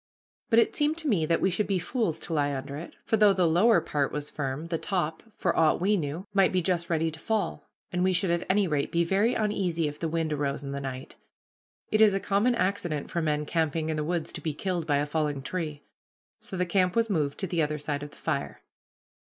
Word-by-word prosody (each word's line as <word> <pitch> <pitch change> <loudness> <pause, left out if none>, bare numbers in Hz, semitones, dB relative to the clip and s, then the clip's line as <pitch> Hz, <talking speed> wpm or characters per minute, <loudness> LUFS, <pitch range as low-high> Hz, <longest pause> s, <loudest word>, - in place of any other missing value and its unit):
But 225 - +4
it 230 - +4
seemed 300 +1 +1
to 325 -2 -3
me 175 - +2
that 165 - +2
we 190 - +3
should 205 +4 0
be 195 - +1
fools 180 - -1
to 170 - -4
lie 145 -2 +1
under 140 +1 -5
it, 165 +4 -8
for 225 - +2
though 210 -2 +6
the 185 -2 +2
lower 180 +5 +5
part 145 -3 -1
was 150 0 -4
firm, 145 +3 -4
the 165 -2 -1
top, 170 -5 -2 0.2
for - - 0
aught 160 -1 +3
we 200 +4 +3
knew, 165 +1 -3
might 195 -2 +4
be 185 - +2
just 170 -1 -1
ready 165 -1 +1
to 155 - -10
fall, 220 +3 -2 0.2
and 180 -1 0
we 185 - +3
should 180 0 +1
at 170 0 0
any 195 0 +3
rate 150 -3 -1
be 170 0 +2
very 200 +7 +2
uneasy 185 -7 0
if 150 0 -6
the 165 - -1
wind 160 -1 -1
arose 140 -1 -2
in 140 - -5
the 140 0 -4
night. 130 -1 -6 0.7
It 215 - +3
is 210 -3 +6
a - - +1
common 205 +5 +2
accident 180 -8 -1
for 170 - 0
men 150 -1 0
camping 160 0 0
in 160 - 0
the 155 - -1
woods 170 +1 -2
to - - -7
be 155 -3 -3
killed 175 -2 -2
by 145 -2 +3
a 145 - +1
falling 150 -2 -1
tree. 155 -2 -4 0.6
So 190 - -7
the 180 - +1
camp 180 0 +1
was 230 0 +3
moved 150 -8 0
to - - 0
the 170 -2 0
other 150 0 0
side 145 -1 -3
of 145 - -6
the - - -19
fire. - - -3
170 Hz, 245 wpm, -28 LUFS, 150-195 Hz, 0.7 s, though